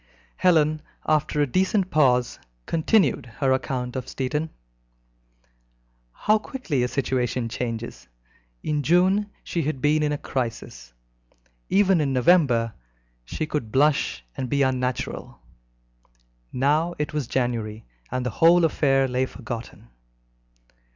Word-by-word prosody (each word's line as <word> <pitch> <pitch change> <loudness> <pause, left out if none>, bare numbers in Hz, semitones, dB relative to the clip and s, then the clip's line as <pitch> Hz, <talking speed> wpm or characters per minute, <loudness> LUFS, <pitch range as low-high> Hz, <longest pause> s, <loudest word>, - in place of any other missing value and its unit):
Helen, 155 -4 +3 0.2
after 150 -1 +1
a - - +4
decent 190 - +1
pause, 125 -5 +2 0.3
continued 160 - +2
her 135 -2 +1
account 130 -1 -2
of 130 -1 -4
Stettin. 150 +4 -2 1.6
How 215 - +2
quickly 195 - -3
a 125 - +1
situation 125 -2 -1
changes! 115 - -5 0.6
In 150 -1 0
June 185 +7 +3
she 170 - -2
had 150 -2 -2
been 150 +3 +2
in 150 -1 +1
a 145 - -1
crisis; 115 - -5 0.8
even 190 -3 +4
in 140 -2 0
November 125 -5 +3 0.5
she 155 - -3
could 145 -8 -4
blush 135 - +1
and 130 - -4
be 140 -1 +2
unnatural; 130 -2 -2 1.1
now 150 +6 +1
it 150 +1 -3
was 150 -5 -2
January, 115 -4 -2 0.2
and 130 0 -2
the 125 - -1
whole 170 - +5
affair 135 -4 +2
lay 130 +1 0
forgotten. 115 - -8
135 Hz, 120 wpm, -24 LUFS, 125-155 Hz, 1.6 s, whole